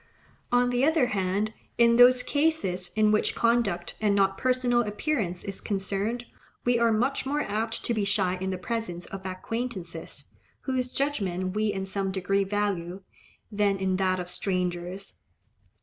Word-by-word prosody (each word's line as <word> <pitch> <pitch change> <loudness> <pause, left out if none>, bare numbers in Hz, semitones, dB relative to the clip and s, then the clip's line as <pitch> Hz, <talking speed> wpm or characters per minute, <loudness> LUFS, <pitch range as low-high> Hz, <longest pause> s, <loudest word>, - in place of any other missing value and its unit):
On 245 0 +3
the 245 +1 +1
other 315 -2 +4
hand, 200 +2 0 0.2
in 235 0 +5
those 250 +1 +7
cases 285 - 0
in 215 -1 +4
which 215 - +2
conduct 230 -7 +1
and 205 -2 +3
not 195 -1 +3
personal 250 0 +2
appearance 210 - -2
is 195 -1 -5
concerned, 205 +4 -2 0.4
we 240 -1 +3
are 235 -1 +4
much 250 +6 +1
more 290 +2 -1
apt 225 0 -2
to 235 - +1
be 215 -2 0
shy 200 -2 +1
in 190 - -1
the 185 - -2
presence 180 -3 -4
of 195 -1 -8
acquaintances, 185 -4 -5 0.4
whose 255 -2 -1
judgment 190 -10 -1
we 215 0 +1
in 190 -1 -3
some 195 0 -2
degree 195 +1 +1
value, 195 -3 -2 0.5
than 205 -1 +2
in 190 -1 0
that 185 -1 +1
of 180 - -4
strangers. 180 0 -2
205 Hz, 155 wpm, -27 LUFS, 190-240 Hz, 0.5 s, those